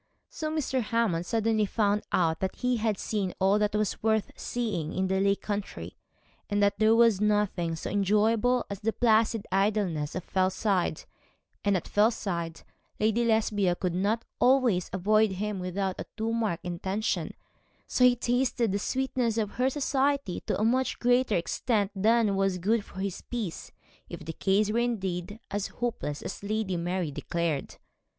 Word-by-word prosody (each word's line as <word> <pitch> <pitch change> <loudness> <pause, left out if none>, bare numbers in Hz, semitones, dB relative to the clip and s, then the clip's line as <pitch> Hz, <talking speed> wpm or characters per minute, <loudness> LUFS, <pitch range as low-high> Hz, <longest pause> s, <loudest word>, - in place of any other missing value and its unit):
So 310 -1 -3
Mr. 290 -4 -1
Hammond 210 -7 0
suddenly 220 -2 +1
found 210 0 +1
out 160 -2 +2
that 190 - -2
he 250 -1 0
had 215 -2 0
seen 200 -4 -2
all 195 +2 +3
that 210 0 +1
was 210 -2 -1
worth 220 -1 +1
seeing 205 -10 -3
in 190 0 -1
the 190 0 +1
Lake 200 0 +1
country, 205 -1 -4 0.5
and 205 -1 0
that 200 0 +2
there 220 +1 +5
was 230 -4 +4
nothing 205 -5 +1
so 160 - -6
enjoyable 215 +5 +2
as 200 -1 -6
the 220 +1 -1
placid 225 -2 +2
idleness 195 -7 0
of 185 - -3
Fellside; 185 -2 0 0.6
and 200 -2 +3
at 175 - -6
Fellside 195 -6 0 0.4
Lady 220 +2 +2
Lesbia 210 -5 +2
could 180 -1 -2
not 205 +6 0
always 245 -8 +3
avoid 210 +2 +2
him 205 +1 -3
without 185 +1 -2
a - - -5
too 225 +1 -1
marked 205 -7 -1
intention, 190 +4 -2 0.5
so 250 - +1
he 250 -1 +7
tasted 245 -2 0
the 200 - 0
sweetness 255 -1 -1
of 210 -2 0
her 255 +2 +1
society 275 -5 0
to - - 0
a 215 - +2
much 255 +3 +1
greater 245 -2 +2
extent 205 +4 0
than 215 +1 +3
was 195 -1 +1
good 210 +5 +1
for 190 - -9
his 195 -2 -3
peace, 220 -9 -4 0.4
if 170 -3 -8
the 160 - -5
case 205 +4 +1
were 230 - +1
indeed 205 -4 -2
as 205 0 -1
hopeless 220 -12 -4
as - - -6
Lady 205 -2 -1
Mary 175 -1 -2
declared. 165 -1 -2
210 Hz, 165 wpm, -28 LUFS, 190-230 Hz, 0.6 s, he